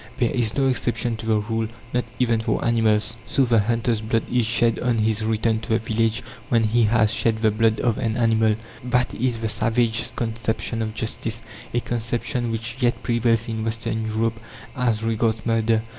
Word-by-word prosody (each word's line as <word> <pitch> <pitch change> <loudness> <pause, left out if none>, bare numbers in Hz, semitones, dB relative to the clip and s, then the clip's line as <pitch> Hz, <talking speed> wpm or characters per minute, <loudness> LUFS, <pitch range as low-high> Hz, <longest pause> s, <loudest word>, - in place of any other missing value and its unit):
There 120 - +1
is 115 -3 0
no 135 - +3
exception 120 -2 0
to 110 0 -7
the 110 -1 +3
rule, 110 +1 -1 0.3
not 125 0 +1
even 120 -2 +2
for 110 -1 -1
animals; 110 -1 +2
so 135 +3 +2
the 115 -2 +3
hunter's 115 +1 0
blood 110 0 0
is 125 -3 +2
shed 115 0 +2
on 120 -2 +1
his 110 0 +1
return 110 0 +1
to 110 - -10
the 110 - +3
village 110 0 0 0.3
when 115 -2 +3
he 115 +1 +3
has 110 0 +3
shed 115 -1 +1
the 110 - +5
blood 110 +1 +2
of 120 0 +1
an 115 -3 -1
animal. 110 -2 +3 0.3
That 125 0 +1
is 125 0 0
the 110 0 -2
savages' 115 +2 +1
conception 115 -1 -2
of 110 -1 -3
justice 115 0 -4 0.3
a 120 - 0
conception 120 +1 -2
which 115 +2 -3
yet 120 -2 +1
prevails 115 0 +1
in 110 -1 -3
Western 110 0 -2
Europe 115 +1 -1 0.4
as 115 -4 0
regards 115 0 0
murder. 115 -1 +2
115 Hz, 190 wpm, -23 LUFS, 110-120 Hz, 0.4 s, the